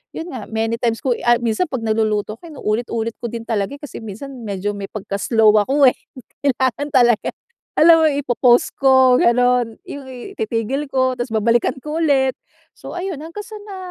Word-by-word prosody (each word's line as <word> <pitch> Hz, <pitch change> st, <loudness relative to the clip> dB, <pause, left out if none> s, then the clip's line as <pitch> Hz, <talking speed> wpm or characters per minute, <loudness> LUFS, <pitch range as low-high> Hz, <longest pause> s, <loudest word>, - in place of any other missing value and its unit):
yun, 330 Hz, -, -5 dB
nga 220 Hz, -, -6 dB
many 225 Hz, +1 st, -1 dB
times 230 Hz, -2 st, 0 dB
ko 260 Hz, -4 st, 0 dB
i -, -, -9 dB
ay 240 Hz, 0 st, +4 dB
minsan 230 Hz, +9 st, +1 dB
'pag 260 Hz, -4 st, -3 dB
nagluluto 215 Hz, -1 st, 0 dB
ko -, -, -38 dB
inuulit-ulit 230 Hz, -3 st, -2 dB
ko 235 Hz, -, -3 dB
din 230 Hz, -1 st, -5 dB
talaga 205 Hz, -2 st, -1 dB
eh, -, -, -36 dB
kasi 295 Hz, -, -8 dB
minsan 225 Hz, +7 st, -8 dB
medyo 205 Hz, 0 st, -3 dB
may 200 Hz, -1 st, -6 dB
pagka 200 Hz, -1 st, -5 dB
slow 220 Hz, -2 st, +4 dB
ako 275 Hz, +3 st, +4 dB
eh. -, -, -5 dB, 0.5 s
Kailangan 265 Hz, +1 st, 0 dB
talaga, 240 Hz, -4 st, +3 dB, 0.5 s
alam 325 Hz, 0 st, +7 dB
mo -, -, +5 dB
ipo-pause 250 Hz, -3 st, +3 dB
ko 260 Hz, -2 st, +5 dB
ganun, 245 Hz, -1 st, +2 dB
yung 280 Hz, -1 st, -8 dB, 0.3 s
ititigil 230 Hz, +6 st, -2 dB
ko 260 Hz, -1 st, +1 dB
tapos 240 Hz, -1 st, -4 dB
babalikan 230 Hz, +4 st, +1 dB
ko 300 Hz, +4 st, -4 dB
ulit. 265 Hz, -3 st, +2 dB, 0.4 s
So -, -, -9 dB
ayun, 360 Hz, -5 st, -4 dB
hanggang 335 Hz, +6 st, -8 dB
sa 435 Hz, -, -9 dB
na 390 Hz, -2 st, -7 dB
245 Hz, 185 wpm, -19 LUFS, 225-275 Hz, 0.5 s, alam